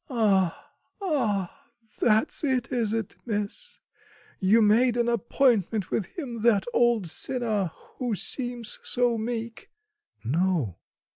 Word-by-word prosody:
"Ah, 200 -8 +1 0.3
ah! 270 - -1 0.4
That's 220 +8 +2
it, 260 -4 0
is 230 -4 0
it, 220 -5 -3
miss; 220 - -4 0.6
you 200 +4 +4
made 230 +3 +4
an 240 0 +2
appointment 235 -4 +1
with 200 - -3
him, 245 -9 -5
that 220 -4 +3
old 240 -6 +3
sinner, 215 -1 -1 0.3
who 245 -4 -1
seems 240 - -3
so 245 -1 +1
meek?" 230 0 -5 0.5
"No." 150 - 0
225 Hz, 115 wpm, -26 LUFS, 200-245 Hz, 0.6 s, you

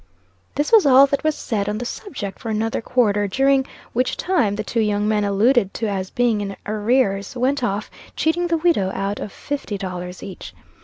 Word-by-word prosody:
This 290 +1 0
was 445 -4 +7
all 270 +1 +8
that 280 0 -2
was 310 -1 +1
said 205 -7 -2
on 210 - -2
the 240 - -4
subject 230 - -6
for 230 - -6
another 220 +1 -1
quarter, 210 -4 +1
during 270 +5 +2 0.3
which 250 +2 0
time 305 - +1
the 215 - -3
two 230 - -2
young 210 -1 +1
men 210 -1 +2
alluded 205 +1 +2
to 225 - -1
as 190 -2 -3
being 235 -4 +1
in 195 -1 -4
arrears, 210 -1 0
went 260 +2 +1
off, 210 -2 -2 0.2
cheating 345 +2 +1
the 335 -1 +1
widow 315 - +2
out 195 +1 -2
of 205 - -5
fifty 280 -8 -4
dollars 180 -2 -6
each. 185 - -9
220 Hz, 195 wpm, -21 LUFS, 200-270 Hz, 0.3 s, all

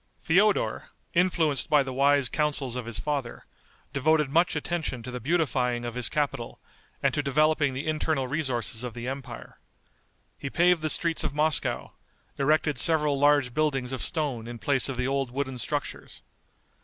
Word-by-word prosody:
Feodor, 195 +5 +2 0.2
influenced 170 -5 +2
by 150 -2 +5
the 130 -1 -6
wise 140 0 +3
counsels 145 -3 -1
of 125 -2 -5
his 115 -3 -4
father, 140 -5 -3 0.5
devoted 150 0 +2
much 170 +4 +3
attention 160 -8 -3
to 125 - -7
the 125 - -5
beautifying 125 -5 0
of 120 - -4
his 125 0 -2
capital, 140 -6 -2 0.4
and - - +2
to - - +1
developing 145 0 +2
the 135 - -4
internal 155 -3 0
resources 125 -5 -1
of 125 -3 -6
the 120 +1 -5
empire. 130 -2 -7 0.8
He 140 - -4
paved 175 +2 +3
the 155 - 0
streets 165 +1 0
of 140 - -3
Moscow, 155 +1 0 0.5
erected 150 -1 +2
several 150 -3 +3
large 145 -3 +3
buildings 135 -4 0
of 130 - -3
stone 140 -8 -2
in 120 0 -7
place 135 +2 +1
of 130 - -4
the 125 0 0
old 135 -1 -1
wooden 130 0 -3
structures. - - -4
140 Hz, 165 wpm, -27 LUFS, 125-155 Hz, 0.8 s, by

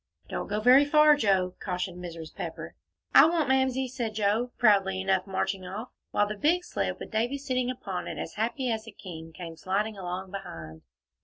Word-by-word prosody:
"Don't - - -3
go 210 +1 -1
very 250 +5 +7
far, 300 +1 +6
Joe," 190 -8 +2
cautioned 180 -1 -3
Mrs. 165 -2 -8
Pepper. - - -6 0.4
"I - - +9
won't, 330 -2 +1
Mamsie," 265 0 +2
said 240 -4 -4
Joe, 220 +4 +1
proudly 195 -4 +4
enough, 190 0 +1
marching 190 0 -2
off, 200 +7 -6 0.2
while 205 - +2
the 210 - -3
big 330 - +2
sled, - - -2
with - - -8
Davie 235 +5 0
sitting 255 -3 -1
upon 200 -8 -4
it - - -5
as - - -5
happy 240 +4 -1
as 220 0 -3
a - - -8
king, 165 -5 -9
came 165 0 -8
sliding 205 +5 -1
along 185 +1 -5
behind. 80 - -8
210 Hz, 185 wpm, -28 LUFS, 185-250 Hz, 0.4 s, I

